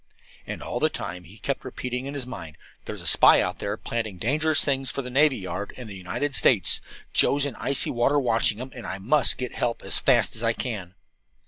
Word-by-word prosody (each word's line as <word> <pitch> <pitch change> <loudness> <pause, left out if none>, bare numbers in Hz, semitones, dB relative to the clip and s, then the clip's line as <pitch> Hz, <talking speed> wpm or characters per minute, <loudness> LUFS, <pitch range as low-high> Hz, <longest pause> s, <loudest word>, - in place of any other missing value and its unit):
And - - -6
all - - -3
the - - +3
time 90 +1 -6
he 95 +6 -14
kept 140 +4 -3
repeating 125 0 -5
in 140 - -5
his 135 -3 -4
mind, 85 -12 -9 0.3
"There's - - -7
a - - -9
spy - - +7
out - - -1
there 100 +1 -3
planning 110 -5 -4
dangerous 155 - +2
things 135 -2 0
for 140 - -4
the 125 - -7
navy 145 +1 +4
yard 95 +1 -6
and 125 -3 -8
the 100 - -8
United 95 +10 -3
States. 115 -7 +4 0.3
Joe's 140 0 +4
in 140 - -3
the - - -13
icy 140 - +2
water 120 +4 +2
watching 115 -4 +2
him, 130 +3 -7
and 120 -4 -8
I 95 - -3
must 125 +9 +2
get 125 -2 -4
help 115 - -2
as - - 0
fast - - +3
as 110 - -2
I 115 0 +2
can." 100 -7 -5
120 Hz, 225 wpm, -25 LUFS, 105-135 Hz, 0.3 s, spy